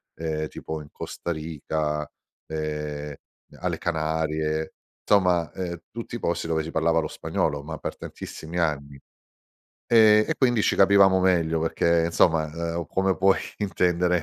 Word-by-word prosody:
ehm, 80 -1 -3
tipo 80 +1 -6
in 75 - -12
Costa 85 - -5
Rica, 75 -1 -3 0.4
ehm, 75 -1 -4 0.5
alle - - -2
Canarie, 80 -1 -1 0.3
somma, 90 -5 +3
ehm, 85 -2 -5
tutti 115 +1 -6
posti 85 -3 -1
dove 80 -1 0
si 80 - -6
parlava 80 0 +2
lo - - -3
spagnolo, 70 0 -2
ma 80 +2 -6
per - - -5
tantissimi 80 +2 -8
anni. 70 -4 -1 0.9
Ehm, 110 -2 +6
e - - +1
quindi 120 -5 +3
ci - - +2
capivamo 95 -1 +6
meglio 85 -3 +2
perché 85 +1 +2
insomma, 80 -2 +2 0.3
ehm, 85 -2 -3
come 95 +4 +1
puoi 95 0 +4 0.2
intendere, 90 -3 +1
80 Hz, 140 wpm, -25 LUFS, 80-90 Hz, 0.9 s, Ehm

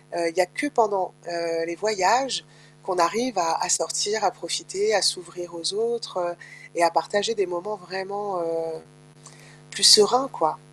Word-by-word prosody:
heu, 170 -1 -1
il - - -18
y - - +5
a 180 - 0
que 290 - 0
pendant, 200 -5 +2 0.2
heu, 165 -1 -3
les 170 - -5
voyages 220 +3 +2 0.5
qu'on 185 +1 -4
arrive 235 +3 -3
à - - +1
à - - -5
sortir, 165 +5 -1
à - - +2
profiter, 170 +4 -4
à 195 - +2
s'ouvrir 175 0 -8
aux 165 -1 -1 0.2
autres, 235 -3 -5
heu 175 - -4 0.4
et 170 - +2
à 165 - +4
partager 205 +6 -1
des 190 - 0
moments 210 +5 -6
vraiment, 195 +2 -6
heu, 165 -1 -5 0.9
plus 195 +6 -5
sereins, 245 +6 +4
quoi. 155 -1 0
180 Hz, 175 wpm, -23 LUFS, 165-210 Hz, 0.9 s, y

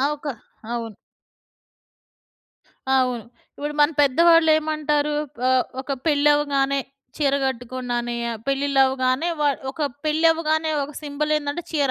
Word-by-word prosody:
ఆ! 270 - +2
ఒక 295 - -12 0.5
అవును. 230 -3 -4 2.0
అవును. 250 -4 +1 0.3
ఇప్పుడు 295 +1 -4
మన 295 +2 +5
పెద్దవాళ్ళేమంటారు? 310 -1 +3 0.3
ఆహ్, 255 -1 +3 0.2
ఒక 270 - -12 0.2
పెళ్ళవగానే 285 -2 +2 0.4
చీర 280 -2 +1
గట్టుకున్నానే, 245 -1 -3 0.3
పెళ్ళిల్లవ్వగానే 270 +1 +1
వా 295 - +3 0.2
ఒక 305 +2 -5 0.2
పెళ్ళవ్వగానే 315 0 +2
ఒక 290 +2 -6
సింబలేందంటే 300 +2 -2
చీర. 285 -4 +1
285 Hz, 95 wpm, -23 LUFS, 260-305 Hz, 2.0 s, మన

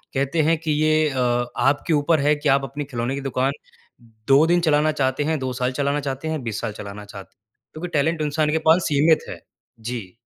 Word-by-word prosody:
कहते 140 +4 +1
हैं 165 - +3
कि 160 -2 -2
ये 155 0 +2
अ, 125 -2 0
आपके 145 +4 +1
ऊपर 150 +2 +2
है 150 +1 +3
कि 145 - -1
आप 140 - -6
अपनी 145 +3 -5
खिलौने 120 +2 -2
की 140 - -5
दुकान 135 0 0 0.8
2 140 +3 +6
दिन 175 +1 +3
चलाना 155 -1 +2
चाहते 135 -2 -1
हैं, 155 0 -1
2 130 -1 -3
साल 125 0 -1
चलाना 140 +2 -1
चाहते 140 +2 -4
हैं, 155 -5 -3
20 115 -2 -4
साल 115 -2 -3
चलाना 105 0 -8
चाहते 100 -1 -12
हैं। 100 - -66 0.3
क्योंकि 175 +3 -6
टैलेंट 160 +2 0
इंसान 150 +1 0
के 160 - +1
पास 170 +2 +5
सीमित 155 +2 +3
है। - - -8 0.4
जी। 110 -5 -6
145 Hz, 215 wpm, -22 LUFS, 125-155 Hz, 0.8 s, 2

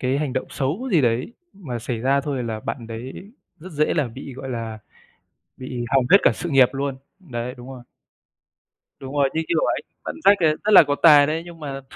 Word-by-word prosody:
cái 130 +2 0
hành 145 -4 -2
động 130 - -2
xấu 165 - -3
gì 165 - +5
đấy 120 - 0 0.2
mà 140 -12 -6
xảy 115 0 -4
ra 135 +4 +2
thôi, 140 -3 -3
là 110 -1 -4
bạn 115 0 -5
đấy 125 - -8 0.3
rất 180 +3 -11
dễ 150 0 +1
là 150 -6 0
bị, 135 +4 -9
gọi 135 0 -8
là, 115 -3 -5 0.8
bị 125 -2 -5
hỏng 130 -2 +3
hết 195 - +10
cả - - +5
sự 175 - -5
nghiệp 135 -3 +5
luôn. 135 -1 -3 0.2
Đấy, 125 -7 -6
đúng 125 +1 -11
rồi. 130 -2 -10 1.2
Đúng 135 +1 -8
rồi, 140 -1 +3
như 160 - 0
kiểu 165 -2 +1
ấy, - - 0 0.2
bạn - - -5
Jack 200 - +7
ấy 155 0 +2
rất 215 - +2
là 200 - +10
có 145 - -1
tài 150 -3 +8
đấy. 160 +2 -2
Nhưng 170 -2 -12
mà, 135 -2 -5
135 Hz, 220 wpm, -22 LUFS, 125-155 Hz, 1.2 s, hết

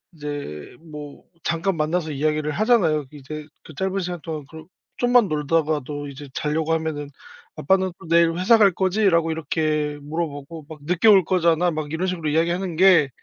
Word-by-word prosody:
이제 145 - -7
뭐 150 -3 -10 0.2
잠깐 170 +2 -1
만나서 155 +1 -1
이야기를 150 +1 -1
하잖아요. 175 - +2
이제 150 +1 -8 0.2
그 160 - -13
짧은 190 +4 -1
시간 180 -1 -4
동안 155 -3 -6
그러 160 0 -11 0.3
좀만 245 -3 +4
놀다가도 150 -1 -1
이제 140 +1 -10
자려고 155 +2 -1
하면은 155 -3 -3 0.5
"아빠는 190 +3 +1
또 - - -12
내일 170 0 +4
회사 195 +6 +5
갈 205 -3 +5
거지?"라고 185 -3 +2
이렇게 155 -1 -1
물어보고 150 0 -5
막 155 -2 -10
"늦게 180 +7 +1
올 195 -3 +7
거잖아." 175 -1 +2
막 155 -2 -4
이런 175 +3 -1
식으로 175 -4 -3
이야기하는 170 +3 0
게 175 -6 +6
160 Hz, 365 characters per minute, -23 LUFS, 150-180 Hz, 0.5 s, 올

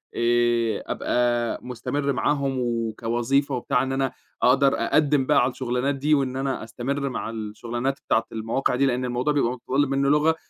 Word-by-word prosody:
آآ، 120 -2 +1
أبقى 120 -1 0
مُستمِرّ 135 +3 -2
معاهم 135 +2 0
وكوظيفة 120 +3 0
وبتاع 125 +1 0
إن 135 - -3
أنا 135 0 0 0.3
أقدر 135 +2 +5
أقدِّم 145 -3 +2
بقى 145 -1 +4
على 125 +1 +1
الشغلانات 125 +2 -1
دي، 150 +3 +1
وإن 135 -3 +1
أنا 135 -2 -2
أستَمِرّ 135 +5 -3
مع 125 - -4
الشغلانات 115 +4 -4
بتاعة 115 - +2
المواقع 115 +4 -1
دي، 140 +2 +2
لأن 125 -1 0
الموضوع 125 +4 0
بيبقى 130 -5 +1
متطلِّب 135 +3 -1
مني 140 0 +1
لغة، 150 +2 +3
130 Hz, 160 wpm, -24 LUFS, 120-140 Hz, 0.3 s, أقدر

